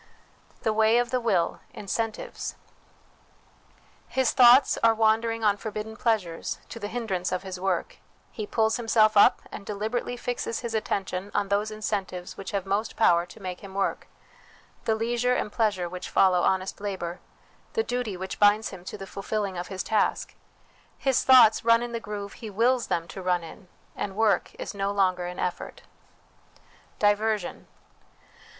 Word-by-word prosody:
The 220 - +1
Way 220 +1 +4
of 240 0 +1
the 255 - +1
Will 195 -8 +1 0.2
Incentives. 220 +2 -4 1.5
His 260 -2 +1
thoughts 250 +1 +6
are 225 0 +5
wandering 225 +1 +2
on 205 -1 +3
forbidden 215 +1 -6
pleasures, 215 -8 -1
to 230 - -8
the 205 - -4
hindrance 205 -6 -2
of 185 0 -2
his 190 -1 -6
work; 185 -2 -2 0.3
he 215 -2 -5
pulls 220 0 +1
himself 220 -2 +3
up, 205 - +6
and - - -7
deliberately 220 +4 -3
fixes 240 -2 -3
his 235 -2 -4
attention 195 -3 -2
on 205 -1 0
those 205 +2 +1
incentives 195 -4 -4
which 195 - -7
have 195 -2 -2
most 205 +3 -1
power 175 -5 +3
to 200 - -14
make 185 -2 -6
him 195 -1 -11
work, 195 - -1 0.8
the 220 - +2
leisure 240 +2 0
and 210 - -2
pleasure 205 -6 0
which 180 +1 -7
follow 185 -2 +4
honest 190 +2 0
labour, 185 -4 -4 0.5
the 450 - +1
duty 245 - -3
which 190 +1 -6
binds 205 +1 +4
him 185 -3 -10
to - - -6
the 195 - -7
fulfilling 195 0 -3
of 175 0 -4
his 190 -1 -4
task. 215 -1 0 0.6
His 270 -2 +1
thoughts 250 -4 +7
run 230 +1 +4
in 240 - -5
the 230 - -3
groove 205 -2 -6
he 225 - -8
wills 235 +4 +2
them 165 0 -1
to 190 - -7
run 180 -1 0
in, 175 +3 -12 0.3
and 195 -2 -4
work 210 -4 +1
is - - -6
no 200 0 -1
longer 185 -3 +1
an 180 0 -7
effort. 180 - -4 1.1
Diversion. 210 -1 0
210 Hz, 165 wpm, -26 LUFS, 190-225 Hz, 1.5 s, thoughts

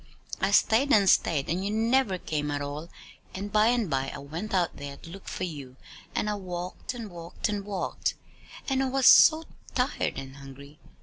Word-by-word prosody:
"I 195 - +2
stayed 230 +7 +3
and 200 -2 +5
stayed, 155 -6 +3
and 175 +4 -1
you 200 - -1
never 225 -1 +2
came 150 -4 -3
at 145 0 -1
all. 150 +4 -6 0.5
And 200 +2 -5
by 215 +1 +4
and 235 -3 +2
by 135 -3 -1
I - - -7
went 160 +9 -6
out 180 -3 0
there 140 -1 -7
to 165 - -13
look 195 +2 -11
for - - -4
you, 145 -7 -6 0.4
and - - 0
I 210 - 0
walked 185 +5 -5
and 225 -4 -7
walked 170 +5 -4
and 205 -1 -2
walked. 195 -2 -2 0.5
And 270 -1 +1
I 265 - 0
was 265 0 0
so 320 0 +8 0.3
tired 255 +2 0
and 135 0 -8
hungry!" 140 +2 -12
185 Hz, 195 wpm, -27 LUFS, 145-215 Hz, 0.5 s, so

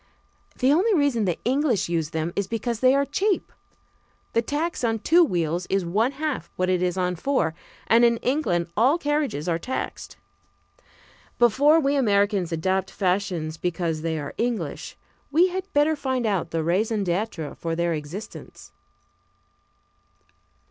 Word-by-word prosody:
The 265 +2 +3
only 395 +7 +3
reason 280 - +2
the 175 -3 0
English 260 - +1
use 165 -3 -1
them 160 +2 -3
is 200 -2 -1
because 230 +1 -3
they 255 +2 +5
are 280 0 +2
cheap. 380 +8 -1 0.8
The 230 - +3
tax 295 +6 -3
on 225 -1 +1
two 335 +10 +4
wheels 175 - -1
is 195 -2 0
one 220 +10 +1
half 285 - -3
what 185 0 0
it 180 -1 +1
is 180 0 0
on 180 -1 0
four, 175 - 0 0.3
and 230 +1 +4
in 235 -1 +4
England 180 - -1
all 255 +9 +4
carriages 295 - -1
are 170 -1 0
taxed. 260 +9 -5 1.2
Before 280 +7 +5
we 280 -2 +1
Americans 200 -7 +2
adopt 185 +3 0
fashions 180 -5 -1
because 165 -2 -2
they 160 0 -2
are 145 -2 -5
English, 235 -1 -3 0.3
we 335 +6 +4
had 375 +2 -5
better 295 +2 +3
find 260 -4 -2
out 195 -6 0
the 165 -1 -2
raison 205 +5 0
d'être 175 -4 -2
for 165 -1 -3
their 170 0 0
existence. 155 +7 -8
210 Hz, 150 wpm, -24 LUFS, 175-275 Hz, 1.2 s, they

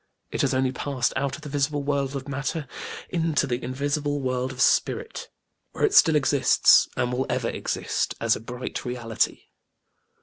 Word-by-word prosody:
It - - -1
has - - +1
only 130 0 +1
passed 130 -2 -1
out 135 0 -1
of 155 - -13
the 150 - -7
visible 145 +1 0
world 140 -1 -1
of 135 0 -5
matter 140 +2 -3 0.4
into 165 -4 +1
the 125 -2 -3
invisible 145 +3 -1
world 130 -1 -1
of 130 - -10
Spirit, 450 - +1 0.4
where - - +1
it 410 - 0
still 160 - +6
exists 140 -2 +5
and 125 0 0
will 130 +2 -1
ever 125 -2 0
exist, - - -2
as - - +2
a - - -6
bright 120 +3 -6
reality. 120 -3 -1
135 Hz, 170 wpm, -25 LUFS, 125-145 Hz, 0.4 s, still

